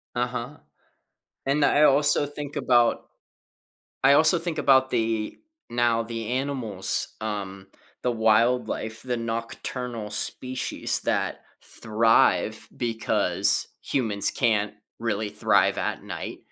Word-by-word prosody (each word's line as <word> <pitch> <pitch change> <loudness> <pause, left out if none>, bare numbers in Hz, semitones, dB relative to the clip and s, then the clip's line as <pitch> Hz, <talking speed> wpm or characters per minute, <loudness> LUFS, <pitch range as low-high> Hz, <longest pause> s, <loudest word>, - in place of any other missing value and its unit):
Uh-huh, 125 +3 -3 0.9
and 140 +2 +2
I 145 - +3
also 145 0 +4
think 145 0 -8
about 120 -2 +2 1.0
I - - +6
also 160 +4 +6
think 165 -1 -4
about 130 -1 +4
the 110 -2 -1 0.3
now 120 -1 +1
the 115 -1 -6
animals, 125 -7 0
um, 100 -3 -5 0.3
the 125 - +1
wildlife, 110 0 +1
the 125 -1 -2
nocturnal 115 0 -5
species 130 0 0
that - - -2 0.2
thrive 110 +1 +1
because 115 -2 0 0.2
humans 110 -7 0
can't 105 -4 0 0.2
really 110 -2 -2
thrive 105 0 +2
at - - -3
night, - - -7
115 Hz, 105 wpm, -25 LUFS, 110-130 Hz, 1.0 s, I